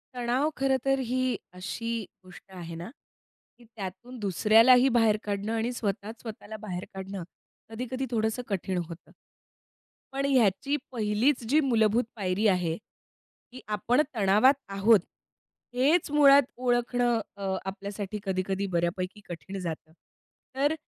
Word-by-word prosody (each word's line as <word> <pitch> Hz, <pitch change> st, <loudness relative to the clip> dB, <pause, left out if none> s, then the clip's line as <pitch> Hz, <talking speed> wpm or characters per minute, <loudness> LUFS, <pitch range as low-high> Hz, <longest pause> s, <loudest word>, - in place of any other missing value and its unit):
तणाव 250 Hz, +5 st, +1 dB
खरंतर 270 Hz, 0 st, +1 dB
ही 255 Hz, 0 st, +1 dB, 0.2 s
अशी 230 Hz, +5 st, -4 dB, 0.2 s
गोष्ट 185 Hz, +1 st, -15 dB
आहे 170 Hz, -2 st, -7 dB
ना, 170 Hz, +4 st, -7 dB, 0.7 s
की 240 Hz, -, -18 dB
त्यातून 225 Hz, +3 st, -8 dB
दुसऱ्यालाही 225 Hz, +6 st, +5 dB
बाहेर 220 Hz, -2 st, +4 dB
काढणं 205 Hz, +1 st, -2 dB
आणि 230 Hz, +2 st, 0 dB
स्वतःच 220 Hz, 0 st, -4 dB
स्वतःला 220 Hz, -1 st, -8 dB
बाहेर 185 Hz, -4 st, -5 dB
काढणं 190 Hz, -1 st, -6 dB, 0.5 s
कधी-कधी 250 Hz, +3 st, -4 dB
थोडंसं 220 Hz, +1 st, 0 dB
कठीण 190 Hz, -2 st, -2 dB
होतं. 170 Hz, 0 st, -11 dB, 1.0 s
पण 275 Hz, +1 st, -1 dB
ह्याची 260 Hz, 0 st, +2 dB, 0.2 s
पहिलीच 230 Hz, +3 st, +1 dB
जी 300 Hz, +4 st, +5 dB
मूलभूत 230 Hz, -3 st, +3 dB
पायरी 200 Hz, 0 st, 0 dB
आहे, 180 Hz, -4 st, +1 dB, 0.7 s
की 255 Hz, -, -10 dB
आपण 215 Hz, +6 st, +2 dB
तणावात 210 Hz, +5 st, +5 dB, 0.2 s
आहोत, 200 Hz, +2 st, +5 dB, 0.8 s
हेच 290 Hz, +5 st, +3 dB
मुळात 285 Hz, -1 st, +7 dB, 0.2 s
ओळखणं 245 Hz, -1 st, +1 dB, 0.2 s
अ, 195 Hz, -1 st, -2 dB
आपल्यासाठी 200 Hz, +1 st, -5 dB
कधी-कधी 190 Hz, +1 st, -1 dB
बऱ्यापैकी 180 Hz, +4 st, -1 dB
कठीण 180 Hz, +3 st, -7 dB
जातं. 160 Hz, -3 st, -5 dB, 0.6 s
तर 285 Hz, +3 st, +2 dB
220 Hz, 120 wpm, -28 LUFS, 195-250 Hz, 1.0 s, मुळात